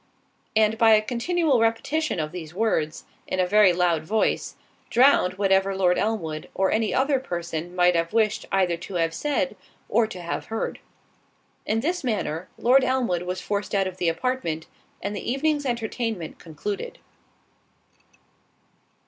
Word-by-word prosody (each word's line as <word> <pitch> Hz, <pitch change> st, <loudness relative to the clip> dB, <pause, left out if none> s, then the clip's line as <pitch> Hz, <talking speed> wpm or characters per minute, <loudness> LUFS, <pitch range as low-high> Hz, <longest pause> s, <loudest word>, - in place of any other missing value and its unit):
And 220 Hz, 0 st, +3 dB
by 225 Hz, -1 st, +7 dB
a 215 Hz, -, +5 dB
continual 275 Hz, +4 st, +1 dB
repetition 230 Hz, -, 0 dB
of 155 Hz, -1 st, -2 dB
these 170 Hz, -2 st, -8 dB
words, 175 Hz, -8 st, 0 dB, 0.2 s
in 185 Hz, -, -2 dB
a 185 Hz, -, +4 dB
very 205 Hz, 0 st, +5 dB
loud 175 Hz, -3 st, +1 dB
voice, 215 Hz, +7 st, 0 dB, 0.3 s
drowned 240 Hz, -8 st, +4 dB
whatever 195 Hz, 0 st, +2 dB
Lord 180 Hz, -2 st, +2 dB
Elmwood, 165 Hz, -8 st, -2 dB
or 190 Hz, 0 st, +2 dB
any 220 Hz, 0 st, +1 dB
other 270 Hz, +1 st, +2 dB
person 175 Hz, -5 st, -5 dB
might 180 Hz, -1 st, +4 dB
have 165 Hz, 0 st, 0 dB
wished 220 Hz, -2 st, +1 dB
either 185 Hz, -3 st, +2 dB
to 180 Hz, +3 st, -8 dB
have 165 Hz, -1 st, +1 dB
said 290 Hz, -, -1 dB, 0.3 s
or 230 Hz, -1 st, +2 dB
to 185 Hz, -, -8 dB
have 170 Hz, -1 st, -4 dB
heard. 225 Hz, 0 st, -3 dB, 0.9 s
In 225 Hz, +1 st, +1 dB
this 350 Hz, +5 st, -1 dB
manner, 185 Hz, -, -2 dB
Lord 255 Hz, +3 st, +4 dB
Elmwood 255 Hz, -9 st, +1 dB
was 180 Hz, +1 st, -4 dB
forced 205 Hz, 0 st, -2 dB
out 195 Hz, -1 st, +2 dB
of 185 Hz, -1 st, -5 dB
the 180 Hz, -2 st, +1 dB
apartment, 165 Hz, -6 st, -2 dB, 0.4 s
and 205 Hz, +1 st, -3 dB
the 235 Hz, -, -3 dB
evening's 290 Hz, +1 st, 0 dB
entertainment 225 Hz, -6 st, -3 dB
concluded. 205 Hz, -, -5 dB
205 Hz, 150 wpm, -25 LUFS, 175-240 Hz, 0.9 s, by